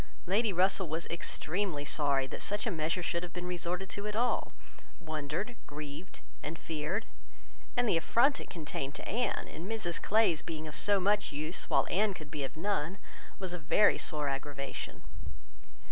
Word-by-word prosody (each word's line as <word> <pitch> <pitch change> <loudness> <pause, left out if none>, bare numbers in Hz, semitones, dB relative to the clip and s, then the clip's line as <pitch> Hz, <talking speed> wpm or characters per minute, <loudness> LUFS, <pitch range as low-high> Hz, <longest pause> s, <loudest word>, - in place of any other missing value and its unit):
Lady 205 +4 +3
Russell 185 -1 +3
was 160 +2 -1
extremely 170 -1 -1
sorry 140 -2 +3
that 130 - -6
such 205 +1 0
a 225 - +1
measure 165 +1 0
should 170 0 0
have 175 -1 -6
been 180 0 -4
resorted 180 +1 -2
to 200 +3 -4
at 210 - -3
all, 245 +2 +1 0.5
wondered, 160 +7 -3
grieved, 150 +4 -7 0.2
and 160 +2 -4
feared; 160 +7 -2 0.7
and 245 -1 +4
the 175 - +4
affront 240 - +4
it - - -9
contained 145 -4 -4
to - - -6
Anne, 235 +2 0
in 165 +4 -7
Mrs 210 -6 -1
Clay's 210 -7 +4
being 160 -2 -5
of 155 - -7
so 205 -1 +4
much 205 +2 +2
use, 155 +4 -1
while - - +4
Anne 200 +1 +3
could 155 -4 -9
be 150 -3 -2
of 135 - -5
none, 190 -1 0 0.4
was 185 -2 -3
a 180 - -3
very 170 +7 +5
sore 150 -4 +2
aggravation. 140 0 -4
175 Hz, 175 wpm, -32 LUFS, 155-200 Hz, 0.7 s, very